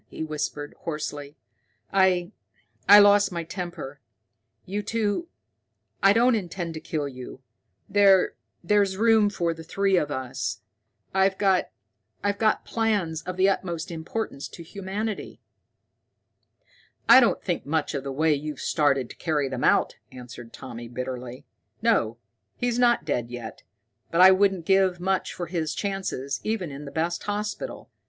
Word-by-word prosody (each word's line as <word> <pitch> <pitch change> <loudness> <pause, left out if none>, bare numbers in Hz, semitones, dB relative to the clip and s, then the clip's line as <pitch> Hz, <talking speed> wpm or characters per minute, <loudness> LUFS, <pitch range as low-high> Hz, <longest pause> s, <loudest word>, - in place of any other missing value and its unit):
he - - -6
whispered 150 -1 -4
hoarsely. 145 -2 -5 0.6
"I 185 -2 +3 0.6
I 205 - +11
lost 205 -1 +6
my 170 -1 -3
temper. 165 -5 -6 0.7
You 200 +3 -3
two 220 +8 -1 0.7
I 195 - +6
don't 240 +4 +4
intend 175 -5 -3
to 160 - -6
kill 150 -2 -3
you. 130 0 -10 0.4
There 195 -2 +4 0.3
there's 200 +1 +2
room 220 -1 +4
for 170 -4 -1
the 165 - -10
three 195 +3 +1
of 150 -4 0
us. 130 -2 -4 0.5
I've 190 0 +2
got 195 -2 +2 1.0
plans 205 -8 0
of 185 0 -4
the 190 +1 +4
utmost 175 -4 -2
importance 165 -2 -4
to 170 - -11
humanity." 200 +4 -5 1.7
"I - - +10
don't 240 - +2
think 175 -6 -2
much 155 0 -1
of 140 -2 -3
the 140 - -4
way 155 +3 +2
you've 150 +1 -4
started 140 -5 +1
to - - -11
carry 150 -4 0
them 130 -1 -4
out," - - +3
answered 120 -2 -10
Tommy 120 -2 -8
bitterly. 125 0 -6 0.4
"No, 115 +1 +2 0.4
he's 245 -1 -1
not 240 -8 +3
dead 120 -5 -1
yet, 120 -2 -8 0.5
but 170 - -1
I 185 +1 +9
wouldn't 190 -3 +2
give 190 -1 +3
much 190 +1 -1
for 175 - -5
his 165 -2 -3
chances, 190 -9 -3
even 215 -8 -2
in 140 +2 -8
the 140 - -8
best 165 +3 -1
hospital. 210 - -4
175 Hz, 145 wpm, -25 LUFS, 145-195 Hz, 1.7 s, I